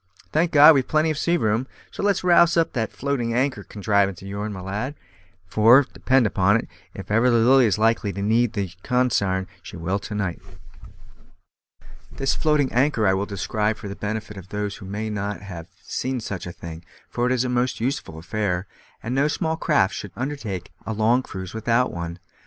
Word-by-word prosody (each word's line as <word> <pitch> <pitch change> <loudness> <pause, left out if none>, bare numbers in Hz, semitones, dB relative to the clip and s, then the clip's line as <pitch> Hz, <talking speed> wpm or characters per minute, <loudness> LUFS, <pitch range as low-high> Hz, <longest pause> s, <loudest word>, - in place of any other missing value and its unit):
Thank 165 +3 +2
God, 150 +1 +9
we've 135 -3 +1
plenty 155 +1 +2
of 155 - -3
sea 175 +1 +2
room; 110 -1 0 0.2
so - - -6
let's 200 -2 +1
rouse 170 -1 +5
up 165 - +2
that 115 -4 -2
floating 125 -4 -2
anchor 130 -4 0
contrivance 100 -3 0
of - - -8
yourn, 100 +2 -4
my 95 - -6
lad, 105 +9 -4 0.5
for, 115 +8 +6
depend 130 -2 +2
upon 100 +1 +3
it, - - -5 0.3
if - - -8
ever 115 +4 +4
the 120 - +4
Lily 125 +2 +5
is 105 - +1
likely 110 -1 +2
to 100 - -5
need 115 +2 +2
the 100 -5 -3
consarn, 100 -7 +1 0.2
she - - -10
will 90 +4 -1
to 105 +1 -7
night." 95 -4 -2 1.7
This 135 - -1
floating 150 -4 +1
anchor 125 -3 +2
I 95 - +4
will 100 +2 -1
describe 105 +2 -1
for - - -8
the 100 - -6
benefit 105 0 -5
of 95 -1 -11
those 105 0 -3
who 95 - -10
may 105 +2 -4
not 100 0 -3
have 90 -5 -8 0.2
seen 130 +6 -3
such 100 -5 -5
a - - -5
thing, 85 -1 -9 0.2
for 120 0 -1
it - - 0
is 130 -1 +2
a - - -1
most 125 +1 0
useful 120 - -3
affair, 90 +1 -2 0.4
and 115 - -3
no 140 +3 +2
small 160 +1 -1
craft 150 - +2
should 105 - -7
undertake 120 - -4
a 110 - -4
long 110 +4 +3
cruise 95 -6 -8
without 115 +3 +1
one. 85 0 -5
110 Hz, 200 wpm, -23 LUFS, 100-130 Hz, 1.7 s, God